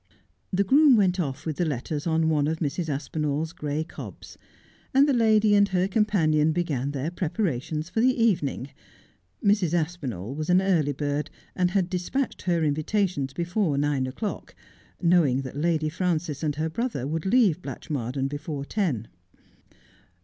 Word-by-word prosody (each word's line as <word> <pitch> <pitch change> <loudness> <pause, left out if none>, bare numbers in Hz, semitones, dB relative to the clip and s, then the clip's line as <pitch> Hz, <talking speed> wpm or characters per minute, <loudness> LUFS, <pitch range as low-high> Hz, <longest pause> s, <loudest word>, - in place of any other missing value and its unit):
The 195 +1 +2
groom 275 +6 +6
went 190 -4 +2
off 140 -6 -3
with 155 -3 -3
the - - +1
letters 145 +2 -3
on 160 0 +2
one 150 -2 +2
of 160 +1 -1
Mrs. 160 +1 -2
Aspinall's 150 +2 -2
gray 150 +1 -2
cobs, 165 - -10 0.6
and 275 +2 +6
the 285 - +3
lady 220 -3 +4
and 200 0 +5
her 185 0 +1
companion 165 -8 +2
began 150 -6 -1
their 145 +3 -3
prepara 175 - -1
tions 155 +2 -4
for 220 - -1
the 255 0 +3
evening. 150 - +1 0.7
Mrs. 200 -5 +3
Aspinall 140 - -3
was 155 +3 -4
an 180 +1 +5
early 175 -7 +2
bird, 145 +1 -2 0.3
and 180 -1 +2
had 185 -1 +1
despatched 185 +9 -2
her 170 -3 +1
invitations 155 -1 0
before 175 0 -1
nine 140 -2 +1
o'clock, 200 - -5 0.5
knowing 160 -7 +3
that 130 0 -7
Lady 155 +1 +1
Frances 165 -3 -1
and 150 -2 -1
her 155 +2 -1
brother 160 - -3
would 160 +5 -2
leave 195 -7 +3
Blatchmardean 135 -6 -3
before 145 0 -5
ten. 145 - -1
160 Hz, 155 wpm, -26 LUFS, 145-190 Hz, 0.7 s, groom